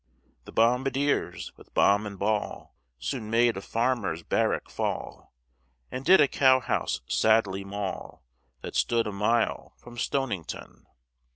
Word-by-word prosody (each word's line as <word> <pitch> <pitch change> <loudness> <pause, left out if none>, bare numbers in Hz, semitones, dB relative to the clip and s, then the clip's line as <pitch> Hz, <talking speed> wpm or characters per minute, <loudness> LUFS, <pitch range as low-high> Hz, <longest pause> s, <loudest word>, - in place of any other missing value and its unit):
The - - -11
bombardiers 130 -2 0
with - - -19
bomb 100 +1 +4
and 100 -1 -8
ball, 105 +2 -2 0.2
Soon 65 - -4
made 115 +1 +3
a 95 - -5
farmer's 115 -8 -1
barrack - - 0
fall, - - -4 0.6
And 130 - -5
did 185 +6 +6
a 145 - +6
cow 130 -1 +4
house 125 - -2
sadly 105 -3 +2
maul 100 -1 -6 0.4
That - - -7
stood 115 -1 +2
a 105 - -3
mile 105 +4 0
from 120 0 -11
Stonington. 120 - -4
115 Hz, 130 wpm, -27 LUFS, 100-125 Hz, 0.6 s, did